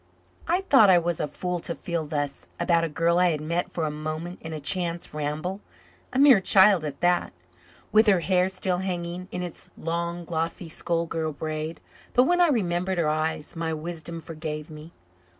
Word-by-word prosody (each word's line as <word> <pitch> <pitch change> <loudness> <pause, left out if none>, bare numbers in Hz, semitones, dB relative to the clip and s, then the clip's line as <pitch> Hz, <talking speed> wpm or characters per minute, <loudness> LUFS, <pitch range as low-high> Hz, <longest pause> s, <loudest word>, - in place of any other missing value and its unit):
I 355 +3 +2
thought 265 - +6
I 180 - +7
was 170 -1 -1
a 150 - -1
fool 180 +4 -3
to 170 0 -4
feel 170 -3 -3
thus 145 -2 -3
about 170 -2 +2
a 165 - -1
girl 170 +3 +2
I 180 0 +4
had 155 -3 -1
met 170 +4 -2
for 165 - -2
a 150 - -1
moment 155 +4 -5
in 160 - -7
a 155 - -4
chance 170 +2 0
ramble 155 +6 -3 0.5
a - - -3
mere 270 -5 +7
child 190 -2 +6
at 145 -2 -6
that, 175 0 +2 0.6
with 220 +1 +5
her 190 -4 +4
hair 185 +1 +2
still 185 -1 -1
hanging 180 -1 -4
in 180 - -3
its 175 - -8
long 170 +1 -3
glossy 165 +1 -3
schoolgirl 165 -1 -2
braid. 155 +2 -4 0.3
But 250 - +5
when 355 +6 +3
I 350 - +6
remembered 185 - 0
her 165 -3 +2
eyes, 155 0 -2
my 165 -1 -2
wisdom 165 +1 -6
forgave 155 -1 -6
me. 155 +2 -10
170 Hz, 185 wpm, -26 LUFS, 155-180 Hz, 0.6 s, I